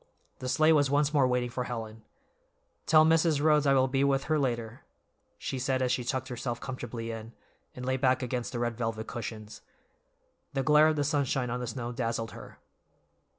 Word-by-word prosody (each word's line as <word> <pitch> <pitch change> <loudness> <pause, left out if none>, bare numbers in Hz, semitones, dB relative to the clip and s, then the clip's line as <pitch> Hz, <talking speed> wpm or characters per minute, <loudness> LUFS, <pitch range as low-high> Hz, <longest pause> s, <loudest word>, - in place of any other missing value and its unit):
The 130 - -4
sleigh 155 +5 +4
was 145 -3 +3
once 145 +1 +2
more 140 -3 +4
waiting 125 -1 0
for 125 0 -3
Helen. 110 -2 -6 0.9
"Tell 155 0 +6
Mrs. 160 -2 +3
Rhodes 150 -1 +3
I 135 - +5
will 130 0 +4
be 135 +1 +1
with 135 -1 +2
her 155 -1 +1
later," 120 -4 -2 0.6
she 130 - -4
said 130 +1 0
as 125 - +1
she 125 - 0
tucked 130 +1 -2
herself 120 -1 -4
comfortably 120 -3 -5
in, 115 +1 -8 0.4
and 125 - -6
lay 130 0 0
back 130 -1 +2
against 125 -1 -3
the 120 - -4
red 120 -1 -1
velvet 115 -1 -3
cushions. 110 -3 -7 0.9
The 135 -1 0
glare 150 +1 +6
of 155 - +2
the 145 - 0
sunshine 135 -4 0
on 125 - -2
the 125 - -4
snow 120 0 -4
dazzled 115 -2 -3
her. - - -11
130 Hz, 195 wpm, -29 LUFS, 120-140 Hz, 0.9 s, Tell